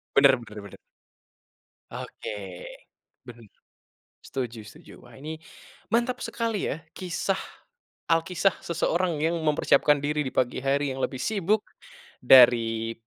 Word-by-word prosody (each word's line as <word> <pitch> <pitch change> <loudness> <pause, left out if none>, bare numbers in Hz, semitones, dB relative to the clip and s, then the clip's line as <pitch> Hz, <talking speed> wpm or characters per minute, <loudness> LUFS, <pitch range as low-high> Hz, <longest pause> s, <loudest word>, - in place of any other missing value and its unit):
Benar 140 -1 +7
benar 105 -2 -12
benar. 100 - -12 1.1
Oke, - - -7 1.0
benar, 120 -1 -11 0.8
setuju 120 -4 -4
setuju. - - -15
Wah, - - -16
ini 155 +3 -7 0.5
mantap 240 +2 +1
sekali, 230 -4 -2
ya, 160 +3 -4
kisah 185 +1 -2 0.7
alkisah 170 +3 +2
seseorang 170 -1 0
yang 165 +2 +1
mempersiapkan 150 -1 +3
diri 150 +1 0
di - - -6
pagi 125 0 0
hari 140 +2 0
yang 130 - -6
lebih 130 - -2
sibuk 210 0 +1 0.6
dari 115 -3 +5
150 Hz, 115 wpm, -26 LUFS, 125-175 Hz, 1.1 s, Benar